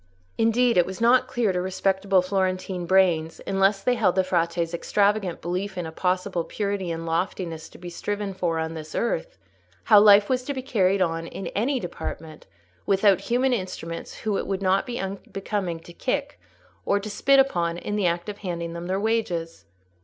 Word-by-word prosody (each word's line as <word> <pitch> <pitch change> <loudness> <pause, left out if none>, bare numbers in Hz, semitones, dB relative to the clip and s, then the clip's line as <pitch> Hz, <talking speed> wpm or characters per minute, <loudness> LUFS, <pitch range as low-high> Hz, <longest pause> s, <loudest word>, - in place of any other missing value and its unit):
Indeed, 235 +1 +3
it 175 - +5
was 190 0 -6
not 250 +2 +4
clear 235 -5 0
to 180 - 0
respectable 190 0 +1
Florentine 185 -1 -1
brains, 175 -4 +2
unless 195 +1 +2
they 250 - +3
held 220 -7 +2
the 190 - +3
Frate's 170 -2 0
extravagant 200 +1 +1
belief 185 +3 -3
in 175 - -2
a 160 - -6
possible 180 +1 -1
purity 200 -1 -3
and 165 0 -4
loftiness 165 -1 -3
to - - -15
be 175 0 -8
striven 205 +2 -3
for 175 -3 -1
on 160 0 -2
this 155 -1 -8
earth, - - -2 0.5
how 215 -5 +7
life 205 -1 +7
was 255 -1 +1
to 285 - -3
be 260 - -4
carried 195 -6 +2
on 165 -1 -2
in 195 - -7
any 255 +6 0
department 160 - -7 0.4
without 195 -1 +4
human 250 +2 +1
instruments 185 -5 -5
whom 210 -2 -1
it - - -4
would 195 0 -2
not 190 +1 +2
be 240 -1 -4
unbecoming 195 -2 -4
to 170 - -13
kick 280 +7 -2 0.4
or 200 - +1
to 205 - -7
spit 270 +6 +3
upon 175 -11 +2
in 205 +4 -4
the 205 -3 +2
act 170 +2 -1
of 210 0 -6
handing 170 -3 -4
them 170 +1 -6
their 190 +1 0
wages. 175 - -2
190 Hz, 185 wpm, -25 LUFS, 175-210 Hz, 0.5 s, how